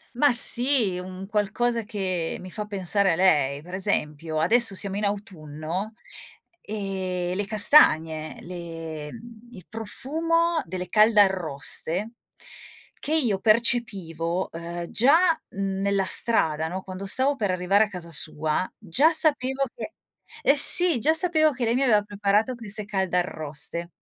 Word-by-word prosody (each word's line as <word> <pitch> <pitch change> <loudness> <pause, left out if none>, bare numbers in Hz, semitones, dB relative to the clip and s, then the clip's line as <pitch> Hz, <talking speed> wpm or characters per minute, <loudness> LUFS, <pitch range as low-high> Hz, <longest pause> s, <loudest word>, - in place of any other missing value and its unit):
Ma 275 +1 +2
sì, 240 -6 +5
un 185 +1 -9
qualcosa 220 +3 -2
che 185 -5 -4
mi 185 - -11
fa 210 +2 -5
pensare 200 -1 0
a - - -1
lei. 145 -6 +1
Per 180 +4 -14
esempio, 155 -5 -2
adesso 225 +4 +3
siamo 195 +1 +1
in 210 - -2
autunno, 185 -1 -6 0.7
ehm, 190 -4 -5
le 200 +2 -3
castagne, 160 - +4
le 165 -3 -8
mhmm, 230 0 -14
il 185 - -13
profumo 325 +9 -2
delle 180 +1 -7
caldarroste 190 -2 +1 0.9
che 310 - -3
io 235 -11 0
percepivo, 195 -7 -1
ehm, 170 +1 -7
già 270 +8 +3 0.4
nella 195 0 -2
strada, 160 -9 -1
no, 185 +3 -6
quando 185 +1 -9
stavo 265 +8 +3
per 205 -5 -2
arrivare 185 +4 +1
a - - -10
casa 180 -4 -10
sua 155 +3 -1
già 235 - +1
sapevo 275 -4 +1
che 240 +8 -9 0.5
Eh 275 - +3
sì 335 0 +7
già 310 +8 +2
sapevo 320 -2 +1
che 255 -3 -6
lei 230 - 0
mi 265 - 0
aveva 220 -5 +3
preparato 205 +4 -1
queste 215 -2 -2
caldarroste. 170 -4 -2
195 Hz, 135 wpm, -23 LUFS, 175-230 Hz, 0.9 s, sì